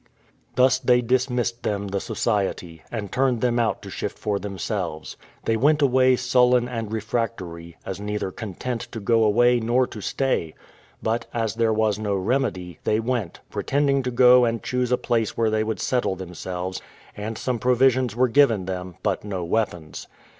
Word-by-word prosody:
Thus 130 Hz, +1 st, +4 dB
they 125 Hz, -1 st, +3 dB
dismissed 125 Hz, -1 st, 0 dB
them 100 Hz, -1 st, -2 dB
the 100 Hz, 0 st, -1 dB
society, 95 Hz, -7 st, -2 dB
and 105 Hz, -4 st, -5 dB
turned 130 Hz, -3 st, +1 dB
them 120 Hz, -1 st, +2 dB
out 115 Hz, -2 st, 0 dB
to -, -, -8 dB
shift -, -, -4 dB
for 105 Hz, -2 st, -1 dB
themselves. 95 Hz, -5 st, -4 dB, 0.3 s
They 115 Hz, -, +2 dB
went 145 Hz, +7 st, +3 dB
away 130 Hz, -1 st, +4 dB
sullen 125 Hz, 0 st, +3 dB
and 115 Hz, -3 st, -4 dB
refractory, 105 Hz, -7 st, -4 dB
as 95 Hz, 0 st, -5 dB
neither 105 Hz, -2 st, -3 dB
content 115 Hz, +4 st, -5 dB
to 115 Hz, -, -4 dB
go 115 Hz, +2 st, +3 dB
away 120 Hz, +3 st, +4 dB
nor 120 Hz, +3 st, +2 dB
to 110 Hz, -, -9 dB
stay: 100 Hz, -, -1 dB, 0.5 s
but, 115 Hz, +2 st, -1 dB
as 115 Hz, -3 st, 0 dB
there 115 Hz, -1 st, +1 dB
was 110 Hz, -1 st, +1 dB
no 105 Hz, -2 st, -1 dB
remedy, 95 Hz, -, -1 dB
they 110 Hz, -, +1 dB
went, 115 Hz, -6 st, -2 dB
pretending 140 Hz, -1 st, +1 dB
to 125 Hz, -, -2 dB
go 125 Hz, 0 st, +6 dB
and 115 Hz, -1 st, 0 dB
choose 125 Hz, -1 st, -1 dB
a 125 Hz, -, +4 dB
place 115 Hz, -3 st, -1 dB
where 115 Hz, -1 st, +2 dB
they 110 Hz, 0 st, +1 dB
would 110 Hz, 0 st, -3 dB
settle 125 Hz, -7 st, 0 dB
themselves; 90 Hz, 0 st, -5 dB, 0.3 s
and 105 Hz, +2 st, -5 dB
some 125 Hz, -1 st, -2 dB
provisions 125 Hz, -1 st, +3 dB
were 130 Hz, +1 st, +3 dB
given 115 Hz, -7 st, +3 dB
them, 90 Hz, -1 st, -5 dB
but -, -, 0 dB
no 95 Hz, -4 st, -4 dB
weapons. 85 Hz, -6 st, -2 dB
115 Hz, 170 wpm, -24 LUFS, 100-125 Hz, 0.5 s, go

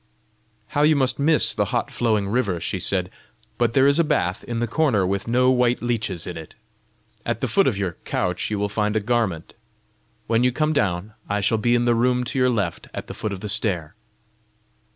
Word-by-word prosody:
"How 145 Hz, -, 0 dB
you 155 Hz, +1 st, +5 dB
must 130 Hz, -2 st, +1 dB
miss 140 Hz, -6 st, +4 dB
the 105 Hz, -, 0 dB
hot 120 Hz, +3 st, -2 dB
flowing 110 Hz, -4 st, 0 dB
river!" 100 Hz, -5 st, 0 dB
she 95 Hz, +3 st, -3 dB
said. 90 Hz, 0 st, -1 dB, 0.5 s
"But 120 Hz, -1 st, +2 dB
there 135 Hz, +2 st, +4 dB
is 140 Hz, +3 st, +4 dB
a -, -, +5 dB
bath 90 Hz, -, -1 dB
in 120 Hz, -1 st, -4 dB
the 120 Hz, -, +1 dB
corner 115 Hz, -5 st, +1 dB
with 100 Hz, +2 st, -2 dB
no 125 Hz, +2 st, +3 dB
white 125 Hz, -1 st, +1 dB
leeches 110 Hz, -8 st, -2 dB
in 90 Hz, -, -6 dB
it! 80 Hz, -1 st, -10 dB, 0.7 s
At 120 Hz, -1 st, -2 dB
the -, -, -1 dB
foot 195 Hz, -1 st, +3 dB
of 110 Hz, -, 0 dB
your 95 Hz, -3 st, -2 dB
couch 90 Hz, 0 st, -2 dB
you 105 Hz, -, -2 dB
will 105 Hz, 0 st, 0 dB
find 105 Hz, +1 st, -1 dB
a -, -, +3 dB
garment. 105 Hz, -7 st, -1 dB, 0.7 s
When 115 Hz, +1 st, +2 dB
you 125 Hz, -, +3 dB
come 155 Hz, +4 st, 0 dB
down, 100 Hz, -, -1 dB, 0.2 s
I 105 Hz, 0 st, 0 dB
shall 105 Hz, +2 st, +1 dB
be 120 Hz, +3 st, +2 dB
in 120 Hz, 0 st, +1 dB
the 120 Hz, -, +3 dB
room 125 Hz, +2 st, +2 dB
to 130 Hz, +2 st, -2 dB
your 125 Hz, 0 st, +4 dB
left 100 Hz, -8 st, -2 dB
at -, -, -5 dB
the -, -, -8 dB
foot 110 Hz, -, -4 dB
of 100 Hz, -, -6 dB
the 105 Hz, -, -4 dB
stair." 95 Hz, -7 st, -1 dB
115 Hz, 215 wpm, -23 LUFS, 100-125 Hz, 0.7 s, you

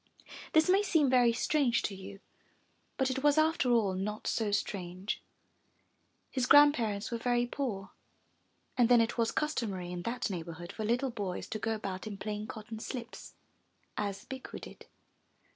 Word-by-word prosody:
This 315 Hz, 0 st, +5 dB
may 380 Hz, +2 st, +5 dB
seem 320 Hz, -9 st, +3 dB
very 245 Hz, -2 st, +5 dB
strange 240 Hz, 0 st, +1 dB
to 205 Hz, -, -2 dB
you, 195 Hz, +1 st, -9 dB, 0.8 s
but 265 Hz, -1 st, +1 dB
it 265 Hz, +1 st, -2 dB
was 295 Hz, 0 st, +4 dB
after 310 Hz, -4 st, +3 dB
all 215 Hz, -5 st, +3 dB
not 210 Hz, +3 st, -3 dB
so 220 Hz, -2 st, 0 dB
strange. 185 Hz, -1 st, -2 dB, 1.1 s
His 255 Hz, -2 st, 0 dB
grandparents 240 Hz, -8 st, +5 dB
were 235 Hz, -, -2 dB
very 240 Hz, 0 st, +2 dB
poor, 235 Hz, -7 st, -4 dB, 0.8 s
and 240 Hz, -2 st, +4 dB
then 245 Hz, -1 st, +7 dB
it 230 Hz, +1 st, +1 dB
was 230 Hz, -1 st, +2 dB
customary 210 Hz, -, -2 dB
in 175 Hz, -1 st, -4 dB
that 235 Hz, +2 st, -2 dB
neighbor 170 Hz, -2 st, -5 dB
hood 175 Hz, +1 st, -8 dB
for 220 Hz, -, -5 dB
little 245 Hz, +4 st, +1 dB
boys 200 Hz, -5 st, -4 dB
to 215 Hz, -, -3 dB
go 225 Hz, +1 st, -1 dB
about 195 Hz, -1 st, -5 dB
in 205 Hz, -2 st, -5 dB
plain 210 Hz, +1 st, -4 dB
cotton 220 Hz, 0 st, -7 dB
slips 235 Hz, +1 st, -7 dB, 0.6 s
as 200 Hz, -1 st, -3 dB
Bikku 265 Hz, -1 st, -7 dB
did. -, -, -12 dB
225 Hz, 160 wpm, -31 LUFS, 200-255 Hz, 1.1 s, then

